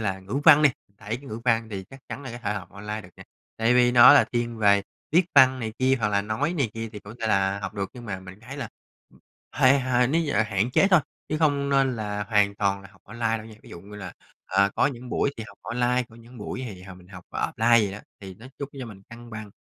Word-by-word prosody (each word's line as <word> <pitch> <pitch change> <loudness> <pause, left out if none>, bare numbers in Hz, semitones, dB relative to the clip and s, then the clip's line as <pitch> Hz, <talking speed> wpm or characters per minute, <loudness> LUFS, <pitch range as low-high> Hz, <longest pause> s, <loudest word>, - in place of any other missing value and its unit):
là 95 -3 -2
ngữ 100 +9 -3
văn 155 -2 +8
đi, 145 - +6 0.3
đấy, 110 +3 -4
cái 140 - -14
ngữ 110 +2 -6
văn 115 -2 +1
thì 95 -2 -5
chắc 135 - -12
chắn 140 - -6
là 130 - -7
có 120 - -7
thể 120 -4 -2
học - - -7
online 105 +2 -6
được 90 - -13
nè, - - -11 0.3
tại 115 +2 +2
vì 125 0 +4
nó 125 +3 +9
là - - +6
thiên 120 -1 -2
về 100 -1 +4 0.3
viết 175 +2 +5
văn 130 -1 +6
này 110 -2 -4
kia 130 +1 +3
hoặc 105 - +1
là 100 -1 +1
nói 110 +10 -1
này 140 -10 -1
kia 115 0 -5
thì 105 - -7
cũng 100 +2 -11
thể 115 - -1
là 100 -1 +1
học 95 - -6
được. 100 -1 -3
Nhưng 120 -2 -11
mà 95 -4 -5
mình 95 +2 -12
thấy 130 +5 -9
là 125 -7 -5 0.4
ừm, - - -22 0.3
hay 135 +2 +4
hơn 125 0 +1
nếu 165 +1 +2
như 145 - -2
là 105 - +3
hạn 105 +2 -1
chế 195 - +4
thôi, 180 - +6 0.3
chứ 155 - -2
không 145 -3 +1
nên 135 -3 +2
là 105 -1 -3
hoàn 100 -1 +2
toàn 100 -1 0
là 100 - -13
học - - -23
online 115 +1 -2
đâu 110 - -10
nha. 110 - -12
Ví - - -15
dụ 85 - -9
như 105 +2 -12
là, 95 -3 -8 0.3
ờ, 100 +2 +2
có - - +4
những 125 -3 -6
buổi 140 - +1
thì 110 - -6
học 100 - -16
online, 125 +1 0
có 115 - -17
những 115 +1 -15
buổi 110 +4 -5
thì 95 -3 -10
h 95 0 -10
mình 90 0 -17
học 90 -3 -12
offline 115 0 +2
vậy 95 - -4
đó, 100 - -7 0.2
thì 95 -2 -9
nó 115 +6 -14
giúp 140 - -5
cho 125 - -5
mình 100 -3 -12
cân 120 0 -12
bằng. 110 -1 -8
115 Hz, 280 wpm, -25 LUFS, 100-125 Hz, 0.4 s, nó